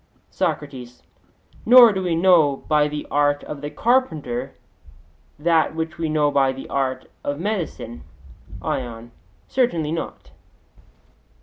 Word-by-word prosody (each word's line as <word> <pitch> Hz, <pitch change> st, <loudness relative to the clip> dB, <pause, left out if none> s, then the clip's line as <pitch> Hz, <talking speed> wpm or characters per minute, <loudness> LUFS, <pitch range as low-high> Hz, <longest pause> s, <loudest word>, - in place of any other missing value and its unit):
SOCRATES: 125 Hz, -4 st, -4 dB, 0.6 s
Nor 240 Hz, -1 st, +8 dB
do 190 Hz, -, -2 dB
we 175 Hz, -3 st, 0 dB
know 165 Hz, -6 st, +3 dB
by 150 Hz, -1 st, +3 dB
the 150 Hz, 0 st, -5 dB
art 145 Hz, 0 st, +2 dB
of 145 Hz, -2 st, -7 dB
the 145 Hz, -, -4 dB
carpenter 160 Hz, -, -1 dB, 0.8 s
that 160 Hz, 0 st, +2 dB
which 160 Hz, +1 st, -4 dB
we 165 Hz, -1 st, -1 dB
know 150 Hz, -1 st, +2 dB
by 135 Hz, -2 st, +3 dB
the 135 Hz, 0 st, -8 dB
art 130 Hz, -1 st, -2 dB, 0.2 s
of 145 Hz, +1 st, -3 dB
medicine? 175 Hz, -, -4 dB, 0.6 s
ION: 120 Hz, -2 st, -4 dB, 0.4 s
Certainly 170 Hz, -, 0 dB
not. 165 Hz, -, -6 dB
150 Hz, 120 wpm, -22 LUFS, 140-170 Hz, 0.8 s, Nor